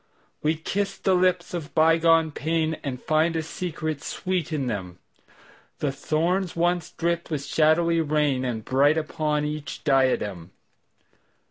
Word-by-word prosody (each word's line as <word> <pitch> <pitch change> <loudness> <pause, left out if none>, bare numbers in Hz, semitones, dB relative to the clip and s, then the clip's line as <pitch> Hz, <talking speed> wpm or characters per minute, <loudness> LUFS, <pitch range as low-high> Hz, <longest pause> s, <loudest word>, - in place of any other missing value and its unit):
We 155 +2 +1
kiss 195 +5 -2
the 190 - +1
lips 180 -1 +1
of 165 -3 -5
bygone 165 0 +4
painAnd 155 -4 -2
find 160 +2 +2
a 160 - -1
secret 155 -3 -4
sweet 180 -4 -3
in 145 -4 -1
them:The 100 +7 -7
thorns 170 +6 -1
once 175 -1 0
dripped 170 0 -2
with 145 -3 -3
shadowy 165 +3 +3
rainAre 135 -7 0
bright 145 +4 +3
upon 150 -1 -1
each 150 -1 -5
diadem. 115 - +1
155 Hz, 120 wpm, -25 LUFS, 145-170 Hz, -, bygone